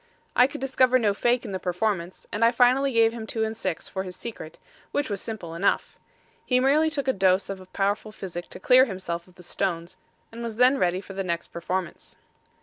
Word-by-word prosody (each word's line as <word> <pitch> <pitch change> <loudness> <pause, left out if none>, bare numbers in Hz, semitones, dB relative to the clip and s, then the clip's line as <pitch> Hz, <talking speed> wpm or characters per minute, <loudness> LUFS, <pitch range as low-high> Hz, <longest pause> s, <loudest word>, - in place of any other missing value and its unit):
I 250 - +6
could 295 +2 -8
discover 255 -1 +3
no 215 -5 +2
fake 240 +4 +1
in 210 - -5
the 190 - -3
performance, 180 0 -2
and 210 - 0
I 230 - +7
finally 250 +3 +3
gave 230 -1 +4
him 225 -2 -6
two 220 0 -1
and 220 0 -2
six 195 -6 -3
for 190 - -4
his 185 -1 -7
secret, 220 -9 -8 0.3
which 285 -6 -1
was 200 - -2
simple 195 -7 -6
enough. 180 +4 0 0.5
He 250 - +2
merely 290 +5 +4
took 285 -3 -3
a 265 - +3
dose 190 -1 +2
of 185 -1 -9
powerful 205 +2 -1
physic 175 -4 -7
to - - -8
clear 255 +6 +6
himself 185 -5 -5
of 180 - -21
the 180 - -14
stones, 175 0 -3 0.3
and 230 +1 -8
was 230 -2 -4
then 250 +3 +4
ready 180 +1 +1
for 195 - -10
the 195 0 -3
next 170 -2 -3
performance. 180 +1 -4
210 Hz, 215 wpm, -26 LUFS, 185-245 Hz, 0.5 s, I